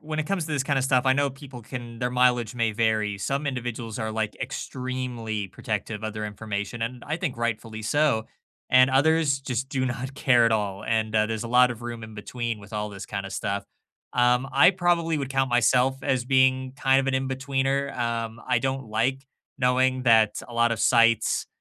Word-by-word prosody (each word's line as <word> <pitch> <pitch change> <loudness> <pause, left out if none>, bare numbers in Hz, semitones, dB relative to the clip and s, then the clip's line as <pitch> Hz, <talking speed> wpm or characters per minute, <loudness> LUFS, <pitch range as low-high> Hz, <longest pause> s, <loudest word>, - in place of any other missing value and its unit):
when 155 0 -3
it 155 - -3
comes 180 -3 -1
to 155 - -5
this 145 -3 +1
kind 140 0 0
of 130 - 0
stuff, 130 -1 +2
I 130 - +6
know 140 +1 +2
people 135 -2 -11
can 120 -1 -8
their 125 - -1
mileage 125 -2 +2
may 115 -2 +1
vary. 110 -2 0
Some 140 +8 -2
individuals 120 -3 -4
are, 110 -1 -3
like, 110 -1 -2
extremely 125 -5 -4
protective 105 +4 -4
of 110 - -3
their 105 0 -4
information, 105 +1 -4
and 125 +2 -4
I 155 +2 -1
think 170 -7 -3
rightfully 115 -1 -3
so. 115 -1 +1 0.4
And 130 +1 +6
others 145 +1 +3
just 130 -1 -3
do 135 -1 -1
not 130 +1 -4
care 125 -4 +4
at 115 - +3
all, 100 -3 -2
and, 110 -1 0
uh, 110 0 +3
there's 110 0 -3
a - - -5
lot 125 +1 +5
of 120 0 -12
room 120 -1 -6
in 110 0 -11
between, 115 +1 -4
with 100 +1 -14
all 105 0 -2
this 100 -2 -8
kind 100 -1 -4
of - - -8
stuff. 100 0 -2 0.5
Um, 125 +2 +2
I 140 +6 +7
probably 175 -3 +1
would 140 -2 -3
count 135 -1 0
myself 125 +2 +3
as 130 -3 0
being 130 0 +2
kind 135 -1 +3
of 135 - -3
an 135 - 0
in-betweener, 135 +1 -1
um, 115 -1 -2
I 125 -2 +2
don't 135 -1 -2
like 130 +5 -1 0.3
knowing 130 0 +2
that 110 -3 +4
a 120 - -10
lot 115 0 +3
of 115 - -3
sites 115 -2 +3
125 Hz, 210 wpm, -25 LUFS, 110-135 Hz, 0.5 s, I